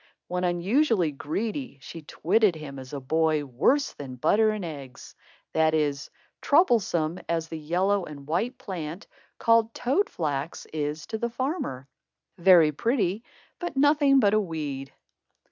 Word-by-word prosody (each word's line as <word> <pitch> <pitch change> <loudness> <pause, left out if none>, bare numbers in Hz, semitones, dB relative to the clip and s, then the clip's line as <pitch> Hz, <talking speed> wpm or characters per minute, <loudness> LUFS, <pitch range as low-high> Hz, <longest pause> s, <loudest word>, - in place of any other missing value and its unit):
When 180 0 -2
unusually 180 - +2
greedy, 210 - -4
she 165 +4 -9
twitted 190 +6 +2
him 145 -3 -8
as 130 -1 -10
a 145 - -4
boy 155 +2 +1
"worse 160 - +1
than 135 -3 -8
Butter 205 - +3
and 215 -4 -3
Eggs"; 140 -6 -9 0.4
that 160 0 +3
is, 145 -2 0
as - - -33 0.3
troublesome 195 - +2
as 165 -1 -1
the 160 - -5
yellow 185 +5 +1
and 140 -2 -10
white 215 - -1
plant, 175 -1 -6 0.3
called 230 0 +3
toad 320 +12 +1
flax, 150 -1 -3
is 150 0 -3
to 220 -1 -5
the 235 - -1
farmer 235 - -3 0.5
very 170 -4 +6
pretty, 210 - 0 0.4
but 350 -5 -5
nothing 285 -1 +5
but 205 -4 +3
a 215 - +4
weed. 145 -7 -5
170 Hz, 145 wpm, -26 LUFS, 150-225 Hz, 0.5 s, very